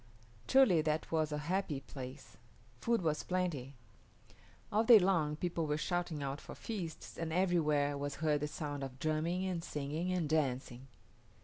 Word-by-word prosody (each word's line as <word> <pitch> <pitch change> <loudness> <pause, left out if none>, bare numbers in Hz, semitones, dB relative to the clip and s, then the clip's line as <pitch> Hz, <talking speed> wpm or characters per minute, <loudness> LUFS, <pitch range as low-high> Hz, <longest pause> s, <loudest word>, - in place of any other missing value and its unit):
Truly 260 -12 +6
that 155 0 -1
was 155 -2 +1
a 150 - -1
happy 160 -2 -1
place. 135 0 -9 0.4
Food 230 - +1
was 155 -2 +1
plenty. 165 -8 -2 1.0
All 215 +2 +3
day 230 0 +9
long 175 -6 +2
people 165 0 -2
were 150 0 0
shouting 160 -1 -2
out 135 +1 -3
for - - -9
feasts, 180 -8 -6
and 165 -1 -2
everywhere 155 -5 +2
was 145 0 -3
heard 150 -1 +1
the 150 - -1
sound 145 -2 -4
of 130 -1 -6
drumming 155 +5 0
and 180 -3 -2
singing 150 +5 -3
and 180 -4 0
dancing. 135 -4 -1
155 Hz, 155 wpm, -34 LUFS, 145-180 Hz, 1.0 s, day